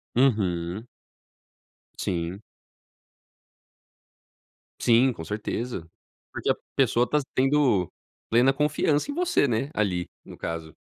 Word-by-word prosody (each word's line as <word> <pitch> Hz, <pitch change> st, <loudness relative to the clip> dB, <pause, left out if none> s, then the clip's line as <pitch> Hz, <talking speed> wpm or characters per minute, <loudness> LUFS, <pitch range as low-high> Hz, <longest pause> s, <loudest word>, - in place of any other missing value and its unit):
Uhum. 105 Hz, -5 st, +1 dB, 1.1 s
Sim. 85 Hz, +3 st, -3 dB, 2.4 s
Sim, 125 Hz, +2 st, +4 dB
com 80 Hz, -, -8 dB
certeza, 105 Hz, -1 st, -4 dB, 0.5 s
porque -, -, -2 dB
a -, -, +1 dB, 0.2 s
pessoa 125 Hz, -2 st, +3 dB
tá 150 Hz, -, +3 dB
tendo 130 Hz, -, +3 dB, 0.4 s
plena 120 Hz, +4 st, +5 dB
confiança 150 Hz, -, +1 dB
em -, -, -2 dB
você, 355 Hz, -, +2 dB
né 120 Hz, +3 st, 0 dB
ali 90 Hz, -4 st, -1 dB, 0.2 s
no -, -, -11 dB
caso. 80 Hz, -1 st, -5 dB
115 Hz, 100 wpm, -26 LUFS, 90-135 Hz, 2.4 s, plena